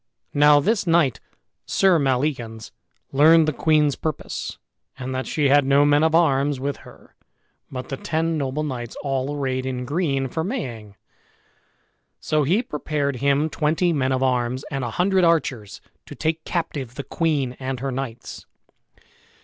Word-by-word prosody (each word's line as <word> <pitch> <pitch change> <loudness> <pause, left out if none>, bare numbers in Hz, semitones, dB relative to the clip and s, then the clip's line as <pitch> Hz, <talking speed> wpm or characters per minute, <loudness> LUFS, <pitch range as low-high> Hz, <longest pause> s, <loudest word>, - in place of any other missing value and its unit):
Now 145 0 +6
this 205 +5 0
knight, 165 -6 +3 0.5
Sir 190 -4 +3
Maleagans, 125 -5 -1 0.4
learned 155 +3 +6
the 155 - +1
queen's 150 -2 +2
purpose, 155 -2 -5 0.4
and 130 +1 -5
that 130 0 -3
she 145 -3 +1
had 145 +1 +5
no 140 +2 +4
men 145 +1 +4
of 160 0 +3
arms 145 -4 +2
with 140 +1 -3
her - - -17 0.6
but 130 -1 -7
the 135 - -4
ten 165 +2 -1
noble 140 0 -2
knights 120 -5 -5
all 135 +1 -2
arrayed 130 -2 -1
in 125 -1 -4
green 140 -2 -1
for 160 +5 -3
maying; 120 - -5 1.2
so 155 -1 0
he 180 - +2
prepared 145 - -2
him 140 +4 +2
twenty 160 +3 0
men 135 -3 0
of 130 0 0
arms, 125 0 0
and 135 -2 -2
a 120 - -2
hundred 185 - +1
archers, 135 - 0 0.3
to - - -9
take 160 0 -2
captive 140 -8 -3
the 140 - -5
queen 145 -7 -1
and 130 -1 -4
her 135 +1 -3
knights. 125 -3 -6
140 Hz, 155 wpm, -23 LUFS, 130-155 Hz, 1.2 s, Now